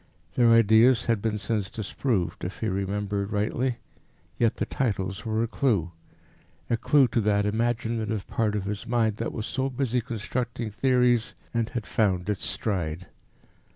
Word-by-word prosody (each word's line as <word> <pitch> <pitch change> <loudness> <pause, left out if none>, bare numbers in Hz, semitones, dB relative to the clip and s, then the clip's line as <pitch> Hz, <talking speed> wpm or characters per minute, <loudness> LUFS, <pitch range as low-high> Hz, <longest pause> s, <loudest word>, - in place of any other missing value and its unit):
Their 120 +4 +4
ideas 115 +2 +5
had 115 -3 +1
been 110 -1 -1
since 105 -3 -2
disproved, 105 -1 -2
if 90 - -5
he 110 - 0
remembered 100 +1 -2
rightly, 115 +4 0 0.6
yet 115 -2 +2
the - - -1
titles 100 -5 -2
were 110 +1 +1
a - - 0
clue 110 - 0 0.8
a - - +4
clue 140 +3 +4
to 115 - +1
that 100 -1 +2
imaginative 110 -1 -1
part 105 -2 0
of 105 - -1
his 105 +4 -4
mind 115 -3 +1
that 115 - -2
was 110 - -4
so 135 +1 -1
busy 125 -2 0
constructing 115 0 -3
theories 125 0 +2 0.2
and 115 -1 0
had 115 -3 -4
found 95 -3 +1
its 100 - -4
stride. 90 -4 -2
110 Hz, 155 wpm, -26 LUFS, 100-120 Hz, 0.8 s, ideas